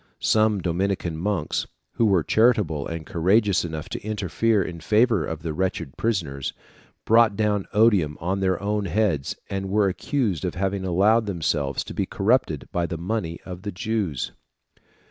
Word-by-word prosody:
Some 110 Hz, -2 st, +2 dB
Dominican 90 Hz, -1 st, -1 dB
monks, 90 Hz, -2 st, -1 dB, 0.2 s
who 115 Hz, -2 st, +2 dB
were 95 Hz, -5 st, +3 dB
charitable 105 Hz, -, +2 dB
and 85 Hz, -1 st, -5 dB
courageous 95 Hz, +3 st, +2 dB
enough 80 Hz, -2 st, -5 dB
to -, -, -5 dB
interfere 105 Hz, 0 st, 0 dB
in 85 Hz, -2 st, -6 dB
favour 110 Hz, +1 st, +3 dB
of 80 Hz, -1 st, -5 dB
the 80 Hz, -2 st, -3 dB
wretched 90 Hz, -5 st, -2 dB
prisoners, 80 Hz, -, -2 dB, 0.5 s
brought 115 Hz, -2 st, +5 dB
down 105 Hz, -2 st, 0 dB
odium 100 Hz, -9 st, +3 dB
on 95 Hz, +3 st, -1 dB
their 95 Hz, -2 st, +1 dB
own 105 Hz, +1 st, -1 dB
heads, 85 Hz, -7 st, 0 dB
and 95 Hz, 0 st, -3 dB
were 105 Hz, 0 st, +3 dB
accused 100 Hz, -, -1 dB
of -, -, -2 dB
having 95 Hz, +1 st, -1 dB
allowed 105 Hz, +5 st, +3 dB
themselves 75 Hz, -7 st, -1 dB
to -, -, -8 dB
be -, -, -1 dB
corrupted -, -, +1 dB
by 85 Hz, -1 st, 0 dB
the 85 Hz, -, -4 dB
money 85 Hz, -1 st, -3 dB
of 90 Hz, -1 st, -7 dB
the 100 Hz, +1 st, -4 dB
Jews. 100 Hz, -, -2 dB
95 Hz, 160 wpm, -24 LUFS, 85-105 Hz, 0.5 s, brought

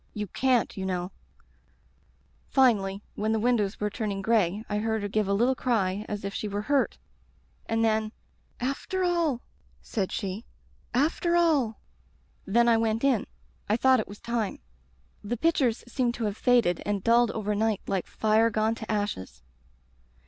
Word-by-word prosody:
You 210 Hz, -1 st, -2 dB
can'ty 245 Hz, +1 st, +1 dB
you -, -, -2 dB
know 180 Hz, 0 st, -2 dB, 1.4 s
"Finally 210 Hz, -7 st, +2 dB
— -, -, -36 dB
^when 215 Hz, +1 st, +1 dB
the 220 Hz, -, +1 dB
windows 215 Hz, -3 st, +1 dB
were 210 Hz, 0 st, -1 dB
turn 215 Hz, -1 st, -3 dB
ing 195 Hz, 0 st, -4 dB
gray 210 Hz, -1 st, +1 dB
I 210 Hz, 0 st, -1 dB
heard 220 Hz, -1 st, -1 dB
her -, -, -1 dB
give 210 Hz, 0 st, 0 dB
a 200 Hz, -, +1 dB
little 240 Hz, +5 st, +3 dB
cry 210 Hz, -6 st, -1 dB
as 205 Hz, -1 st, -4 dB
if 200 Hz, -, -4 dB
she 215 Hz, -, -3 dB
were 205 Hz, 0 st, -3 dB
hurt, 280 Hz, +3 st, +1 dB, 0.7 s
and 225 Hz, 0 st, +1 dB
then 220 Hz, -1 st, +1 dB, 0.5 s
"'After 275 Hz, +9 st, -2 dB
all!' 335 Hz, -8 st, +1 dB, 0.4 s
said 195 Hz, -4 st, -3 dB
she. 200 Hz, +2 st, -4 dB, 0.5 s
'After 325 Hz, +6 st, +1 dB
all!' 295 Hz, -10 st, +2 dB, 0.7 s
"Then 235 Hz, +4 st, +3 dB
I 230 Hz, -1 st, +5 dB
went 225 Hz, +1 st, 0 dB
in. 265 Hz, -6 st, +2 dB, 0.4 s
I 215 Hz, -, +3 dB
thought 260 Hz, +1 st, +4 dB
it 215 Hz, -, -3 dB
was 205 Hz, -, -11 dB
time. 235 Hz, -3 st, -2 dB, 0.7 s
"The 230 Hz, +4 st, -3 dB
pictures 265 Hz, -5 st, +1 dB
seemed 245 Hz, -1 st, 0 dB
to 235 Hz, -, -4 dB
have 205 Hz, -1 st, -2 dB
faded 230 Hz, -8 st, +3 dB
and 205 Hz, -2 st, -2 dB
dulled 235 Hz, 0 st, +4 dB
overnight 215 Hz, 0 st, -1 dB
like 190 Hz, -2 st, -2 dB
fire 220 Hz, +1 st, +2 dB
gone 220 Hz, 0 st, +1 dB
to 220 Hz, -1 st, -6 dB
ashes. 205 Hz, -, -3 dB
220 Hz, 165 wpm, -27 LUFS, 205-240 Hz, 1.4 s, I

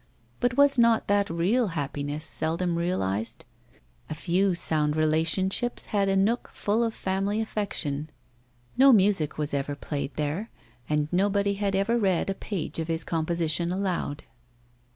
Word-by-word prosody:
But 245 Hz, +1 st, 0 dB
was 280 Hz, -2 st, +5 dB
not 230 Hz, -1 st, +4 dB
that 200 Hz, 0 st, +2 dB
real 195 Hz, +9 st, +1 dB
happiness, 145 Hz, +2 st, -3 dB
seldom 165 Hz, +3 st, -1 dB
realised? 115 Hz, -, -2 dB, 0.6 s
A 155 Hz, -, -4 dB
few 185 Hz, +3 st, +1 dB
sound 155 Hz, -3 st, +1 dB
friendships 165 Hz, +9 st, +1 dB
and 200 Hz, -1 st, +2 dB
a 195 Hz, -, +2 dB
nook 210 Hz, +5 st, +1 dB
full 215 Hz, +3 st, 0 dB
of 225 Hz, -1 st, -2 dB
family 195 Hz, +3 st, -1 dB
affection. 170 Hz, -9 st, -2 dB, 0.7 s
No 270 Hz, +1 st, +7 dB
music 195 Hz, -, +3 dB
was 150 Hz, -1 st, -1 dB
ever 140 Hz, +1 st, -2 dB
played 145 Hz, 0 st, -5 dB
there, 155 Hz, +9 st, -2 dB, 0.4 s
and 150 Hz, -1 st, +1 dB
nobody 200 Hz, +2 st, +1 dB
had 200 Hz, -1 st, -1 dB
ever 220 Hz, +5 st, +1 dB
read 195 Hz, -2 st, +1 dB
a -, -, -1 dB
page 190 Hz, -4 st, -4 dB
of 160 Hz, -, -3 dB
his 165 Hz, 0 st, -1 dB
composition 170 Hz, +1 st, -1 dB
aloud. 185 Hz, -6 st, -2 dB
180 Hz, 145 wpm, -26 LUFS, 155-205 Hz, 0.7 s, No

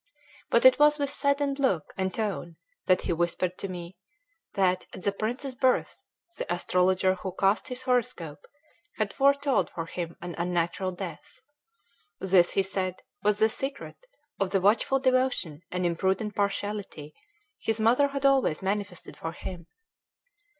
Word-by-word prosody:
But 235 Hz, -, +3 dB
it 260 Hz, +2 st, +8 dB
was 295 Hz, 0 st, +6 dB
with 285 Hz, -2 st, -1 dB
saddened 280 Hz, 0 st, 0 dB
look 195 Hz, -, 0 dB
and 190 Hz, -1 st, -1 dB
tone 195 Hz, -6 st, -3 dB, 0.3 s
that 185 Hz, -1 st, +4 dB
he 175 Hz, -, -1 dB
whispered 175 Hz, +2 st, -1 dB
to 195 Hz, -, -3 dB
me, 175 Hz, -1 st, -8 dB, 0.6 s
that, 185 Hz, -2 st, +1 dB
at 185 Hz, -, -9 dB
the 200 Hz, -, +2 dB
prince's 245 Hz, +7 st, -3 dB
birth, 255 Hz, 0 st, +1 dB, 0.4 s
the -, -, -3 dB
astrologer 185 Hz, +1 st, +2 dB
who 185 Hz, 0 st, -6 dB
cast 195 Hz, +7 st, +2 dB
his 250 Hz, -1 st, -5 dB
horoscope 245 Hz, -, -1 dB, 0.5 s
had 215 Hz, -2 st, -1 dB
foretold 280 Hz, 0 st, +3 dB
for 165 Hz, -1 st, -5 dB
him 170 Hz, 0 st, -5 dB
an 175 Hz, 0 st, -6 dB
unnatural 175 Hz, +2 st, 0 dB
death. 185 Hz, -, -8 dB, 0.8 s
This, 185 Hz, -2 st, +4 dB
he 195 Hz, -, +3 dB
said, 185 Hz, -1 st, -3 dB, 0.2 s
was 210 Hz, 0 st, +2 dB
the 220 Hz, +1 st, +5 dB
secret 275 Hz, -, -6 dB, 0.3 s
of 195 Hz, -, +1 dB
the 195 Hz, 0 st, +2 dB
watchful 210 Hz, +7 st, +3 dB
devotion 255 Hz, -, +1 dB
and 180 Hz, 0 st, -2 dB
imprudent 190 Hz, +5 st, 0 dB
partiality 200 Hz, -6 st, -3 dB, 0.5 s
his 225 Hz, 0 st, -1 dB
mother 240 Hz, +6 st, +4 dB
had 275 Hz, 0 st, -3 dB
always 265 Hz, -, +3 dB
manifested 200 Hz, -2 st, -3 dB
for 165 Hz, -, -5 dB
him. 175 Hz, -1 st, -8 dB
195 Hz, 150 wpm, -28 LUFS, 180-255 Hz, 0.8 s, it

